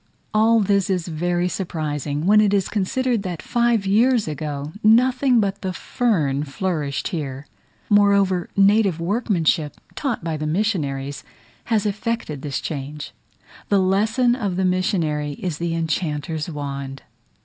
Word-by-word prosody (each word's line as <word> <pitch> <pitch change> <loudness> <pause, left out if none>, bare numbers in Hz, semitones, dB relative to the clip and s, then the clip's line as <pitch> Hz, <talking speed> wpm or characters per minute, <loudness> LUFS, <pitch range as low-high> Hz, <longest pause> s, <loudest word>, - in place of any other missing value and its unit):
All 220 +1 +4
this 200 -1 +1
is 180 -3 -1
very 175 +2 0
surprising, 150 -5 -3
when 210 +2 +6
it 205 -1 +3
is 195 -3 0
considered 235 +3 0
that 180 -4 -5
five 235 -3 +1
years 225 +3 +3
ago 150 -1 -4
nothing 250 +3 +4
but 200 -1 -1
the 185 -1 -3
fern 155 - 0
flourished 150 -2 -2
here. 145 -4 -5 0.4
Moreover, 200 -3 +3
native 200 -3 +4
workmanship, 170 -5 0
taught 270 - -3
by 165 -2 -2
the 155 0 -3
missionaries, 150 -7 -1 0.4
has 220 -3 +1
effected 210 - -2
this 140 -2 -3
change; 150 0 -6 0.6
the 200 - +4
lesson 215 +6 +2
of 205 -8 -2
the 190 +1 0
missionary 165 -6 0
is 165 0 -4
the 170 -1 -1
enchanter's 160 -1 -2
wand. 140 -3 -5
185 Hz, 135 wpm, -22 LUFS, 150-210 Hz, 0.6 s, when